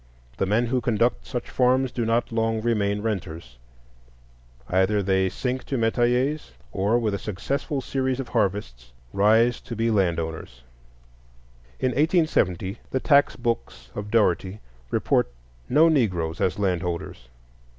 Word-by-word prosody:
The 95 - 0
men 110 +5 +2
who 125 +1 0
conduct 115 +1 0
such 125 -3 -4
farms 130 0 +2
do 120 -1 -2
not 115 +1 +1
long 115 -1 0
remain 105 -3 0
renters; 85 - -5 1.1
either 95 +3 +2
they 95 0 +2
sink 125 +5 -3
to 135 - -2
metayers, 125 - +1 0.2
or 100 +5 +1
with 110 -4 0
a 100 - -2
successful 135 - -3
series 130 -1 -1
of 135 - -5
harvests 95 - -2 0.2
rise 110 +4 +3
to 115 - -7
be 115 +1 +1
land 90 -6 +2
owners. 80 -7 -6 1.2
In 130 - +1
1870 125 - +1
the 130 - -1
tax 140 +1 +4
books 115 - -4
of 105 0 -6
Dougherty 100 -2 +1 0.3
report - - +1 0.4
no 150 +6 +5
Negroes 90 - 0
as 95 - +1
landholders. 90 -10 -3
110 Hz, 135 wpm, -24 LUFS, 95-125 Hz, 1.2 s, no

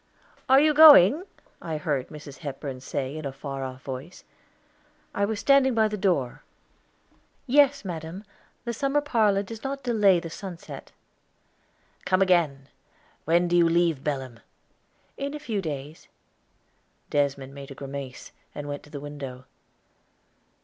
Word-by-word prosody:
_" - - -42 0.5
"Are 265 +1 +7
you 305 +1 +4
going?" 295 - +8 0.4
I 160 -2 -4
heard 145 -4 -2
Mrs. 150 -2 -11
Hepburn 140 -3 -6
say 135 +1 -4
in 155 - -6
a 140 - -3
far 135 0 -6
off 130 0 -7
voice. 135 +6 -8 0.9
I 200 - +1
was 215 0 -3
standing 270 -1 +4
by 220 -1 +4
the 215 - -4
door. 180 -11 0 1.0
"Yes, 280 -1 +3
madam; 170 +2 -6 0.4
the 235 - -2
summer 275 +4 +1
parlor 215 -8 +2
does 220 +2 -9
not 275 0 -4
delay 210 -7 +4
the 165 -1 -8
sunset." 180 -2 -9 1.1
"Come 185 +1 +3
again. 160 -8 +1 0.6
When 170 +2 +3
do 175 - +1
you 170 -1 +5
leave 165 -4 +1
Belem?" 130 -5 -4 0.8
"In 280 +2 -4
few 230 -9 -3
days." 150 -2 -6 1.0
Desmond 140 -2 -1
made 140 -1 -10
a 135 - -9
grimace, 135 -2 -8 0.2
and 145 0 -6
went 145 0 -5
to - - -17
the 145 - -7
window. 140 -3 -8
165 Hz, 140 wpm, -26 LUFS, 140-220 Hz, 1.1 s, going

